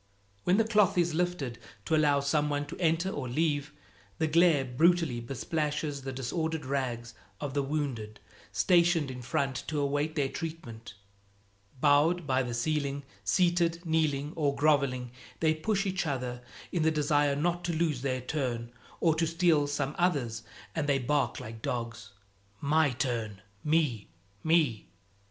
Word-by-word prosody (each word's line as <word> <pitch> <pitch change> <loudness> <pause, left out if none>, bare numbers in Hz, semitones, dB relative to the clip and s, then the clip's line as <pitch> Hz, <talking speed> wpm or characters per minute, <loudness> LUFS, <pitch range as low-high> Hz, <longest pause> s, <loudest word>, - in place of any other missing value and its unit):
When 180 +2 +4
the 225 - +5
cloth 210 -5 +3
is 170 -2 +2
lifted 160 -8 -1 0.3
to 160 - +2
allow 145 -2 +3
some 150 +1 +1
one 145 0 -1
to 145 - -8
enter 170 +2 +1
or 130 -7 -4
leave, 145 +1 0 0.5
the 160 - +1
glare 160 -3 +4
brutally 155 0 +2
besplashes 145 +3 -2
the 135 0 -5
disordered 160 +4 -2
rags 125 -4 -2 0.3
of 145 -2 -4
the 145 - +1
wounded 135 -7 -3 0.3
stationed 170 -5 +3
in 125 -1 -7
front 130 +2 -1
to 155 -2 -1
await 145 +2 0
their 145 -3 +1
treatment. 125 -9 -7 0.8
Bowed 150 +5 +4
by 130 -2 +2
the 120 -2 -3
ceiling, 140 +2 -1 0.2
seated, 170 - +2
kneeling 155 -2 0
or 145 -3 +1
groveling, 140 -4 +2 0.3
they 160 -1 +3
push 195 +5 -1
each 185 -3 -1
other 125 -3 -3 0.3
in 175 - 0
the 160 - +4
desire 145 -2 +2
not 175 +4 0
to 175 - 0
lose 160 -5 0
their 130 -2 -1
turn 125 -4 -3 0.3
or 165 -2 +4
to 165 +1 0
steal 165 -3 +3
some 145 0 -2
other's, 140 -11 +1 0.3
and 145 +1 -1
they 140 - +4
bark 140 +2 0
like 110 0 -8
dogs, 115 -4 -4 0.5
"My 150 +1 +3
turn!" 120 -6 -2 0.2
"Me!" 150 -9 +1 0.4
"Me!" 155 -9 +2
145 Hz, 150 wpm, -30 LUFS, 130-160 Hz, 0.8 s, the